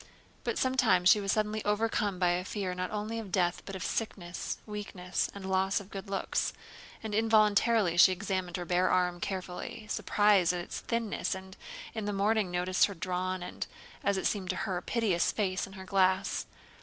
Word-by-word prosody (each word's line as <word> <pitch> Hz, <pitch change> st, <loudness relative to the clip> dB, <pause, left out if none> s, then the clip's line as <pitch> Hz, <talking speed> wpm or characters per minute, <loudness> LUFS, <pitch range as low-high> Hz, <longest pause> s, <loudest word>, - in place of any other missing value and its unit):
But -, -, -1 dB
sometimes 190 Hz, -9 st, +3 dB
she 210 Hz, -, +7 dB
was 195 Hz, -1 st, 0 dB
suddenly 215 Hz, 0 st, 0 dB
overcome 210 Hz, -2 st, 0 dB
by 180 Hz, 0 st, +2 dB
fear 190 Hz, -1 st, -3 dB
not 180 Hz, 0 st, -3 dB
only 215 Hz, +2 st, -3 dB
of 210 Hz, -4 st, -7 dB
death 175 Hz, -1 st, +1 dB
but 195 Hz, -, -5 dB
of 190 Hz, -, -5 dB
sickness, 180 Hz, -6 st, -3 dB
weakness, 200 Hz, -4 st, -3 dB
and 200 Hz, -1 st, -7 dB
loss 190 Hz, +1 st, +1 dB
of 200 Hz, 0 st, -12 dB
good 195 Hz, 0 st, -7 dB
looks, 195 Hz, -1 st, -1 dB, 0.5 s
and 220 Hz, -1 st, -4 dB
involuntarily 215 Hz, -3 st, +3 dB
she 180 Hz, -, +8 dB
examined 185 Hz, -1 st, -2 dB
her 175 Hz, -, -4 dB
bare 180 Hz, +1 st, +2 dB
arm 180 Hz, -1 st, +2 dB
carefully, 185 Hz, +3 st, -5 dB
surprised 205 Hz, -4 st, +3 dB
at 180 Hz, -, -2 dB
its -, -, -6 dB
thinness, 230 Hz, -5 st, -2 dB
and 190 Hz, 0 st, -10 dB, 0.4 s
in 220 Hz, -2 st, -3 dB
the 205 Hz, -, -1 dB
morning 205 Hz, 0 st, +2 dB
noticed 180 Hz, +1 st, +2 dB
her 200 Hz, -, -7 dB
drawn 185 Hz, +1 st, -2 dB
and, -, -, -5 dB, 0.4 s
as 200 Hz, 0 st, +2 dB
it -, -, -2 dB
seemed 190 Hz, -4 st, 0 dB
to 185 Hz, -, 0 dB
her, 180 Hz, -2 st, -2 dB
piteous 210 Hz, -8 st, +1 dB
face 185 Hz, -3 st, -1 dB
in 195 Hz, -, -13 dB
her 190 Hz, -1 st, -9 dB
glass. 190 Hz, 0 st, +1 dB
190 Hz, 180 wpm, -30 LUFS, 180-210 Hz, 0.5 s, she